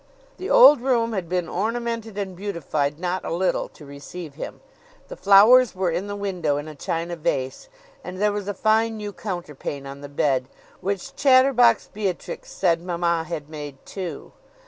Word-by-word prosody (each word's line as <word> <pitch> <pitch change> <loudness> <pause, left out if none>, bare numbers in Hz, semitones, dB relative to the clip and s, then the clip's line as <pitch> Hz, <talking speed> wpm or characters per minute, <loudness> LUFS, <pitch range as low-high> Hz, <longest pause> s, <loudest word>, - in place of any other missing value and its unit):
The 375 - -5
old - - +8
room 235 -3 +1
had 185 -5 -3
been 180 -1 -1
ornamented 230 0 -3
and 190 -2 -4
beautified 155 -7 -2
not 180 +2 -2
a - - -4
little 180 +2 0
to 150 - -15
receive 145 +3 -9
him. 150 - -8 0.5
The - - -7
flowers 220 - +6
were 185 -2 0
in 175 +5 -2
the 205 - -4
window 180 -8 -1
in 145 +1 -5
a 155 - -8
china 165 +4 -3
vase; 135 - -3 0.3
and 185 +1 -7
there 210 +1 +3
was 205 -1 -4
a 205 - -3
fine 220 +1 +2
new 205 -1 -6
counterpane 150 -8 -6
on 140 +1 -8
the 145 - -8
bed, 135 -2 0 0.3
which 195 0 -4
chatterbox 255 -4 +4
Beatrix 200 -4 -4
said 170 -3 +1
mamma 170 -2 -1
had 155 -3 -5
made 145 -3 -8
too. 175 -7 -6
185 Hz, 170 wpm, -23 LUFS, 160-215 Hz, 0.5 s, old